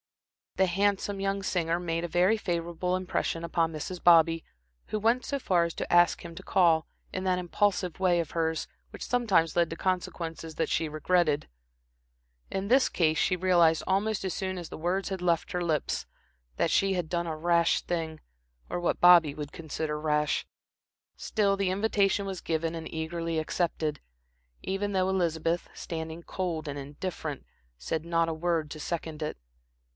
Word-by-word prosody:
The 190 - +4
handsome 200 +2 0
young 195 0 -1
singer 170 -2 0
made 165 -1 -2
a - - -1
very 180 +6 +3
favorable 175 -3 -2
impression 180 -2 -2
upon 165 -1 0
Mrs. 165 +3 -6
Bobby, 165 -1 +6 0.4
who 215 - -2
went 230 +4 +2
so 280 - -2
far 180 -8 +2
as 170 -1 -2
to - - -3
ask 175 0 +4
him 170 -1 -8
to 190 - -9
call, 170 -5 +3 0.3
in 185 - -3
that 185 -1 +2
impulsive 185 0 0
way 180 -2 +3
of 165 -3 -3
hers, 160 -1 -1 0.2
which - - -7
sometimes 205 -10 +2
led 170 -1 +3
to 165 - -5
consequences 165 -3 -3
that 165 - 0
she 160 - 0
regretted. 155 -1 +1 1.0
In 195 +1 -3
this 260 +4 +4
case 160 -3 +2
she 185 - +2
realized, 175 -3 +4
almost 195 +2 0
as 190 - -1
soon 190 -2 -3
as 175 -2 -6
the - - -7
words 180 +5 -1
had 190 -2 -4
left 170 -2 0
her 180 0 -1
lips, 155 -4 -1 0.5
that - - +1
she 195 0 +3
had 180 -3 -1
done 170 +1 -1
a 160 -1 -3
rash 170 +1 +3
thing, 160 -2 -3 0.5
or - - -2
what 175 - 0
Bobby 175 -4 +7
would 150 -1 -6
consider 155 -1 -4
rash. 150 -1 +1 0.7
Still, 200 -3 +1
the 195 -1 0
invitation 200 0 +1
was 190 -2 -5
given 165 0 -1
and 160 -1 -6
eagerly 165 +1 -2
accepted, 155 -2 -1 0.6
even 195 +2 -2
though 185 -1 +2
Elizabeth, 170 -2 0
standing 160 0 -6
cold 165 -5 -3
and 145 0 -4
indifferent, 145 +1 -5 0.3
said 155 - -3
not 165 0 +1
a 165 - -1
word 160 -1 -1
to 155 - -7
second 160 -1 -4
it. 150 - -3
170 Hz, 170 wpm, -28 LUFS, 160-185 Hz, 1.0 s, Bobby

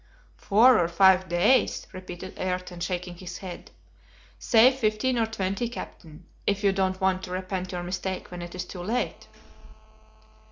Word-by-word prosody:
"Four 225 +3 +5
or 170 - +2
five 185 +1 +4
days!" 175 +10 +2
repeated 185 0 -8
Ayrton, 180 -1 -4
shaking 175 0 -4
his 180 0 -8
head; 185 -2 -9 0.7
"say 235 +2 +6
fifteen 240 0 0
or 225 - +2
twenty, 200 +2 -2
Captain, 165 -8 -10 0.2
if 200 +1 0
you 200 - +4
don't 190 -1 0
want 190 -1 +1
to 180 - -10
repent 185 0 -4
your 175 -1 -4
mistake 185 +1 -4
when 180 -1 -7
it 175 0 -8
is 180 - -4
too 180 - -8
late." 225 +7 -3
185 Hz, 155 wpm, -26 LUFS, 180-205 Hz, 0.7 s, say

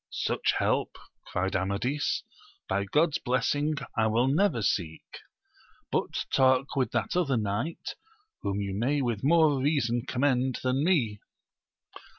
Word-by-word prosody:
Such - - 0
help, - - 0 0.3
cried 95 +2 -2
Amadis, 100 +10 -1 0.4
by 100 +1 0
God's 150 - +2
blessing 145 +5 0 0.2
I 110 -1 +2
will 115 +4 +2
never 145 - +2
seek! 85 -5 -1 0.9
but - - -1
talk 130 0 +3
with 130 -2 +1
that 120 +4 -1
other 150 -8 +2
knight, 105 +10 -3 0.5
whom 100 0 -2
you 100 -1 -3
may 135 +8 0
with 115 -4 -2
more 150 -2 +4
reason 130 -4 0
commend 130 -1 +1
than 130 +2 +1
me. 125 - +1
130 Hz, 130 wpm, -28 LUFS, 105-145 Hz, 0.9 s, more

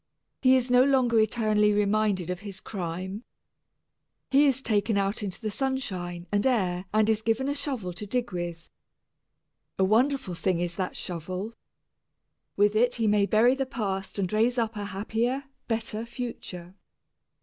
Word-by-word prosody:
He 260 -1 +6
is 250 -1 +1
no 250 0 +7
longer 255 -4 +3
eternally 215 -1 +3
reminded 205 -3 +1
of 180 - -4
his 200 -1 -8
crime. 190 +2 -5 1.1
He 285 +2 +6
is 265 -1 +1
taken 210 -2 +1
out 200 +2 0
into 195 -3 -4
the 215 -2 -3
sunshine 190 -10 -3
and 205 0 +2
air 190 -8 +1
and 215 0 +3
is 220 -1 +2
given 225 +4 0
a 285 - +1
shovel 255 -11 -3
to 205 +4 -7
dig 240 +2 -1
with. 175 -2 -5 1.1
A 190 - +3
wonderful 240 +1 +2
thing 180 0 0
is 175 0 -2
that 185 -1 -3
shovel. 185 +5 -4 1.0
With 205 +1 +3
it 245 +3 +3
he 230 - 0
may 205 -1 +3
bury 230 +5 +5
the 270 0 -2
past 195 -7 -3
and 195 -1 -1
raise 230 +4 +2
up 225 -1 0
a 205 -1 -4
happier, 225 +7 -1 0.2
better 225 -1 -2
future. 230 -7 -6
215 Hz, 160 wpm, -27 LUFS, 190-240 Hz, 1.1 s, no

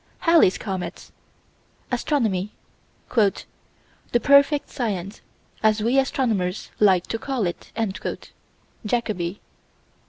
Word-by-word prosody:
Halley's 330 - +5
comet. 190 -3 -5 0.8
Astronomy 225 - 0 0.6
"the 220 +2 -2
perfect 280 +3 +4
science, 205 -6 -3 0.4
as 215 0 +2
we 245 +4 +3
astronomers 220 -9 -1
like 190 -4 +4
to 225 - -4
call 260 -4 -2
it." 175 - -5 1.1
(Jacoby.) 210 -5 -2
215 Hz, 85 wpm, -23 LUFS, 190-260 Hz, 1.1 s, Halley's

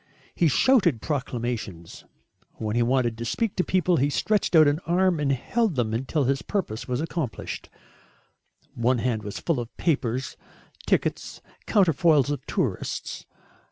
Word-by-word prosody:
He 170 - +2
shouted 175 - +3
proclamations. 120 - -4 0.5
When 110 0 -4
he 120 - +2
wanted 120 -2 +1
to - - -3
speak 220 - -1
to 180 - +2
people 180 -2 +2
he 140 +2 +2
stretched 205 +4 +1
out 155 -2 +8
an 145 +2 +2
arm 180 -1 +2
and 145 -2 +1
held 210 - 0
them 115 -4 0
until 135 +6 0
his 135 +1 0
purpose 165 - -3
was 125 +2 -1
accomplished. 160 -7 -4 1.0
One 120 +2 +1
hand 115 -2 -1
was 105 -1 -6
full 165 -7 0
of 120 -1 -7
papers, 135 -5 -1 0.5
tickets, - - -1 0.3
counterfoils 165 - +3
of 140 -3 -3
tourists. - - -3
140 Hz, 145 wpm, -25 LUFS, 120-170 Hz, 1.0 s, out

